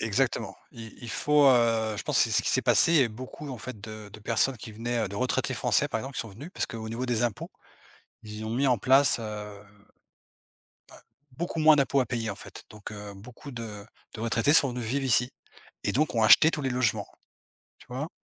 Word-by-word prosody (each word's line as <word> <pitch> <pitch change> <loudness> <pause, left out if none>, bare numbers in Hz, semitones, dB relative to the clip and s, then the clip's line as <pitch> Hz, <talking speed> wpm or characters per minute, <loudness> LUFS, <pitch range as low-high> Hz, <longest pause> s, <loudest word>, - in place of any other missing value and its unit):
Exactement. - - -1 0.2
Il 115 -1 -10
il 120 - -6
faut, 150 +4 +3
heu, 115 -4 +3
je - - -4
pense - - 0
que - - +6
c'est - - -4
ce - - +1
qu'il - - -7
s'est - - +2
passé, 160 -5 +5
heu, - - -2
beaucoup 130 +6 -9
en 125 - -6
fait 120 -4 -8
de 110 0 -9
de 110 - -12
personnes 115 +4 +1
qui 110 +1 -10
venaient, 120 +2 -3
heu, - - -4
de 100 - -7
retraités 125 +4 -1
français - - +1
par 115 - -2
exemple 135 +4 -7
qui - - -2
sont 115 - -6
venus. 130 - -10
Parce - - -1
qu'au 110 -1 -7
niveau 120 +3 -4
des 120 -1 0
impôts 115 -4 -3 0.7
ils 105 0 -8
ont - - -4
mis 135 +3 +1
en 125 - +3
place, 135 +5 +4
heu, 115 - -6
heu, 105 -1 -7 1.7
beaucoup 170 -1 -3
moins 155 0 +7
d'impôts 140 -1 +2
à 130 - +1
payer 115 -2 -3
en 100 - -4
fait. - - -11
Donc 105 0 -10
heu, 105 -1 -8
beaucoup 125 +7 -12
de 110 -4 -8 0.3
de 110 - -7
retraités 115 +5 +2
sont 145 -4 +5
venus 125 0 -5
vivre 135 +4 -1
ici 120 0 +2 0.5
et - - 0
donc 145 -1 0
ont 110 - +3
acheté 155 +8 +7
tous 150 - -3
les 135 - -1
logements. 125 -3 0 0.7
Tu - - -18
vois? 130 +5 -4
120 Hz, 225 wpm, -27 LUFS, 110-135 Hz, 1.7 s, moins